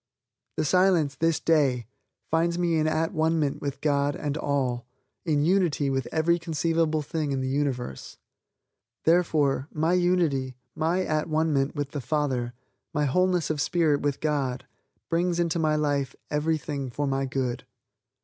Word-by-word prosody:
The 155 - +1
Silence, 180 -4 +3
this 165 +3 +1
day, 140 -9 +2 0.5
finds 170 +1 +2
me 175 -2 +1
in 155 0 +2
at 160 +1 0
one 160 +1 +1
ment 145 -3 -1
with 140 -1 -4
God 145 -1 +1
and 145 -1 -3
all, 130 -5 -1 0.4
in 150 -2 +2
unity 170 -6 +2
with 135 -2 -1
every 170 +2 +2
conceivable 165 -1 0
thing 150 0 -2
in 135 - 0
the 130 - -2
universe. 130 - -3 0.9
Therefore, 155 -5 +2
my 160 +3 +1
unity, 170 -8 +1 0.2
my 170 +4 +1
at 155 0 -1
one 155 0 +1
ment 135 +1 0
with 145 -1 -3
the 145 - -4
Father, 130 -4 -1 0.4
my 150 0 +2
wholeness 180 +3 +2
of 150 -2 -1
spirit 155 -2 +2
with 145 -1 -1
God 140 -5 -1 0.4
brings 175 +1 0
into 170 -1 +1
my 155 -1 +2
life 145 -3 0 0.2
everything 150 -2 -1
for 145 +5 -2
my 135 0 0
good. 130 -2 -2
150 Hz, 155 wpm, -26 LUFS, 140-165 Hz, 0.9 s, Silence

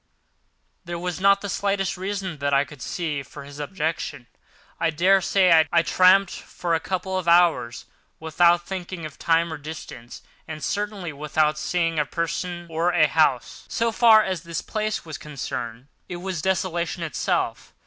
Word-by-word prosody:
There 175 -1 -5
was 180 0 -4
not 200 0 +5
the 200 - -4
slightest 195 -1 -1
reason, 190 -3 -4
that 140 0 +1
I 140 +1 +3
could 145 -2 -14
see, 155 -5 -3
for 140 +1 -11
his 140 +1 -11
objection; 155 -4 -3
and - - -36 0.5
I 165 - +2
daresay 180 -1 +4
I 170 -1 +4
tramped 185 +3 +5
for 170 -2 -4
a 165 - +2
couple 185 +1 -2
of 175 - -7
hours 170 -9 +3 0.3
without 170 +2 +3
thinking 180 -3 -6
of 155 -1 -10
time 165 0 +2
or - - -5
distance, 145 -5 -9 0.2
and 155 -2 -7
certainly 205 -5 -3
without 150 +1 0
seeing 165 -1 0
a 150 - +1
person 175 +2 -3
or 165 +1 0
a 165 -3 +4
house. 150 -6 +1
So 230 0 0
far 220 -1 +6
as 185 -4 -3
the 170 -2 -5
place 215 -3 -2
was 160 -2 -7
concerned, 125 -4 -6 0.2
it 180 - -4
was 180 -2 -4
desolation 175 -1 -1
itself. 160 - -2
170 Hz, 165 wpm, -24 LUFS, 155-185 Hz, 0.5 s, far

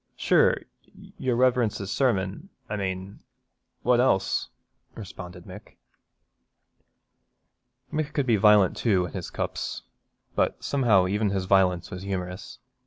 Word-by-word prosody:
'Sure, - - +3 0.6
your 125 -2 0
Reverence's 120 -5 +1
sermon, 115 - 0 0.2
I 105 - -3
mane, 95 0 -4 0.6
what 125 -1 +3
else?' 95 -7 +1 0.5
responded 90 -4 -9
Mick. 100 +2 -12 2.2
Mick 155 -1 -1
could 140 -3 -1
be 120 -3 +3
violent 105 -2 +5
too 95 -6 +1
in 85 - -9
his - - -5
cups, - - -4 0.5
but - - 0
somehow 115 -9 +3
even 105 +3 0
his 95 -1 -2
violence 90 -3 +2
was 90 - -6
humorous. 90 -1 -5
100 Hz, 115 wpm, -26 LUFS, 95-120 Hz, 2.2 s, violent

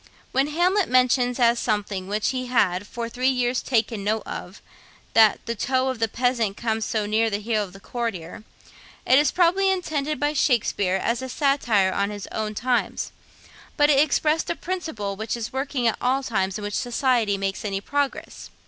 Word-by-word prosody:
When 270 +2 +2
Hamlet 360 +6 +1
mentions, 250 0 +3
as 235 -1 +4
something 205 -4 -2
which 210 +1 0
he 255 -1 -3
had 205 -6 +1
'for 235 -1 -5
three 250 +3 0
years 250 -1 0
taken 225 -4 0
note 215 +2 0
of,' - - -7 0.5
that 220 -2 +5
'the 235 - -2
toe 260 +3 0
of 260 -3 -4
the 225 - +2
peasant 230 -3 0
comes 225 -1 -1
so 215 -2 -1
near 220 +2 +1
the 205 - -1
heel 215 0 -1
of 195 - -9
the 195 - -13
courtier,' 210 -5 -5 0.6
it 260 +2 +6
was 295 -2 +2
probably 370 +2 +3
intended 310 -5 -1
by 290 +1 +1
Shakspeare 215 -9 +1
as 230 +5 -1
a 260 - -5
satire 240 -9 +2
on 200 0 0
his 205 -1 -6
own 215 -1 -3
times; 245 +3 -1 0.7
but 295 -1 +5
it 275 - +4
expressed 305 +2 +2
a 340 - 0
principle 320 - -4
which 220 +3 -3
is 235 +1 -5
working 265 -2 -1
at 225 - 0
all 260 +2 +1
times 195 -5 -1
in 210 - -7
which 205 0 -4
society 240 -4 +1
makes 195 +3 -3
any 195 -2 -2
progress. 285 +6 -3
235 Hz, 185 wpm, -24 LUFS, 210-270 Hz, 0.7 s, it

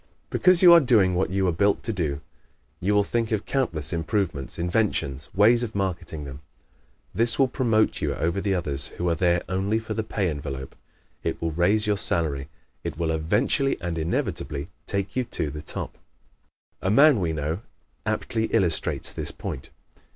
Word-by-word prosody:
Because 185 0 +5
you 175 -1 +10
are 170 - +9
doing 110 - +4
what 90 +1 +1
you 95 +1 0
were 90 - +3
built 100 +5 +1
to 115 - -2
do, 75 -7 -2 0.6
you 105 +3 +1
will 105 - +4
think 115 +2 -1
of 110 -2 -1
countless 80 - +1
improvements, 85 -4 -2
inventions, 85 -7 -1
ways 115 +4 +5
of 110 -3 -4
marketing 90 -6 -3
them. 70 0 -8 0.7
This 115 +1 0
will 135 - +4
promote 115 -4 +1
you - - -1
over 85 +4 -1
the 100 -1 0
others 70 -6 -2
who 90 - -1
are 85 - +3
there 85 +1 +2
only 95 +4 0
for 110 -1 -4
the 110 - -1
pay 105 -3 -1
envelope; 70 -3 -6 0.5
it - - -2
will 80 0 -1
raise 95 +7 +2
your 105 -2 +1
salary; 75 -6 -1 0.3
it - - -4
will 80 -1 0
eventually 105 - +1
and 85 -1 -3
inevitably 80 -2 -2 0.2
take 100 -1 -2
you 130 - +1
to 75 -9 -3
the 75 +1 -6
top. - - -6 0.8
A 95 - 0
man 140 +3 +6
we 85 -3 0
know 80 +4 -2 0.4
aptly 110 -1 -1
illustrates 90 -6 0
this - - -4
point. 65 - -6
95 Hz, 175 wpm, -25 LUFS, 80-110 Hz, 0.8 s, you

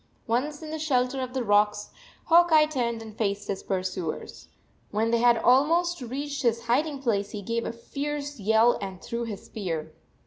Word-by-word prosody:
Once 290 +7 -1
in 310 - -7
the 315 - -4
shelter 265 -3 +1
of 255 0 -5
the 260 - 0
rocks, 210 -1 +2 0.3
Hawk 345 +1 +5
Eye 310 -1 +7
turned 235 -6 -2
and 220 -1 -11
faced 205 -2 -2
his 195 - -3
pursuers. 185 -3 -4 0.4
When 220 +2 0
they 235 - +3
had 240 0 +5
almost 320 +8 +3
reached 280 +4 -4
his 235 -2 +1
hiding 275 +4 0
place 205 -5 0
he 205 -1 -6
gave 230 +3 -2
a - - -2
fierce 285 +4 -5
yell 220 +4 +4
and 190 -2 -6
threw 235 +3 -4
his 210 -4 -7
spear. 170 -7 -4
235 Hz, 180 wpm, -26 LUFS, 210-285 Hz, 0.4 s, Eye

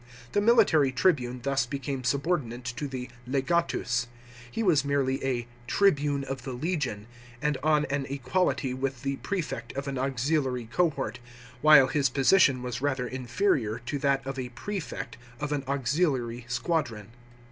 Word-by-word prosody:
The 205 - +2
military 205 - +5
tribune 125 -4 +1
thus 135 -4 +1
became 135 0 -4
subordinate 130 -2 -1
to 120 +4 -3
the 130 -2 -5 0.2
legatus. 135 -3 0 0.4
He 225 - -2
was 160 -8 +4
merely 140 -2 0
a 125 -3 -1
" 120 0 -25
tribune 145 -8 +3
of 135 -1 -5
the 130 +1 -5
legion," 130 - -2 0.3
and 150 +1 0
on 150 0 +3
an 140 -1 -2
equality 140 0 0
with 130 0 -3
the 140 0 -1
prefect 155 - -4
of 140 +1 -4
an 135 -2 -2
auxiliary 135 -1 0
cohort, 140 -7 0 0.4
while 150 -3 +8
his 135 0 +1
position 135 0 +4
was 125 0 -4
rather 135 -3 0
inferior 125 - 0
to 140 +4 -2
that 135 -1 +1
of 135 0 -4
a 125 -1 -4
prefect 185 - -5 0.2
of 150 0 -3
an 145 -2 -1
auxiliary 130 -3 0
squadron. 120 - -1
135 Hz, 150 wpm, -28 LUFS, 125-150 Hz, 0.4 s, while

